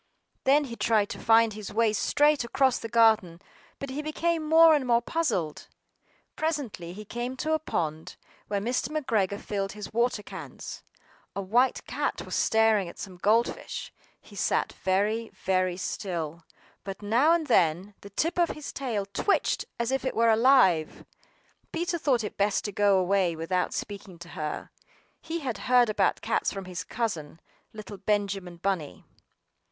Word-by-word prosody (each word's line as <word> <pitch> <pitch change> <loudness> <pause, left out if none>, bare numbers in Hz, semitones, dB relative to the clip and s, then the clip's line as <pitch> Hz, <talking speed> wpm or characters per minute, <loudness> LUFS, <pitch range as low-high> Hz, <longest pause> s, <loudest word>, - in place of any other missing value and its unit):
THEN 285 +3 +5
he 240 -4 -6
tried 215 -3 +2
to - - -6
find 225 -1 +4
his 210 -1 -7
way 220 0 +2
straight 295 +6 +3
across 260 +2 +2
the 230 - -6
garden, 220 -7 +3 0.4
but 275 -1 -6
he 285 +3 -3
became 325 +2 -1
more 325 0 +8
and 285 -4 +1
more 235 -1 +4
puzzled. 235 - -2 0.7
Presently, 285 - -3
he 210 +4 -9
came 240 +4 -4
to 310 +3 -1
a 315 - +2
pond 160 - -3 0.3
where 205 -1 -1
Mr. 245 +7 -1
McGregor 220 -10 0
filled 195 -1 -3
his 210 -1 -8
water 235 -2 +1
cans. - - -8 0.5
A 200 - -2
white 240 +7 +2
cat - - -2
was - - -8
staring 220 -4 +3
at - - -13
some 185 -2 -8
gold 220 +6 +3
fish; - - -8 0.3
she - - -17
sat - - 0
very, 210 +4 0
very 185 -1 0
still, 170 -4 -4 0.4
but 195 +1 -7
now 240 +10 +3
and 335 -2 +2
then 180 - +2
the 200 - -11
tip 330 - -1
of 340 -2 +3
her 305 - -6
tail 230 -7 -2
twitched 200 - 0
as 235 +1 -1
if 270 - 0
it 260 - -2
were 230 0 +4
alive. 220 - +4 0.7
Peter 340 +1 -2
thought 255 -7 +1
it 210 - -6
best 205 +1 +1
to 205 - -2
go 200 -1 +3
away 185 -2 +2
without 180 +3 -1
speaking 200 -3 -6
to 170 0 -11
her; 155 -2 -5 0.5
he 330 +1 -4
had 255 -5 -3
heard 245 -3 +5
about 200 -2 +1
cats - - 0
from 195 -1 -6
his 180 -1 -5
cousin, 170 -10 -4 0.3
little 210 -1 -9
Benjamin 200 -4 -2
Bunny. 170 - -3
215 Hz, 165 wpm, -27 LUFS, 190-255 Hz, 0.7 s, more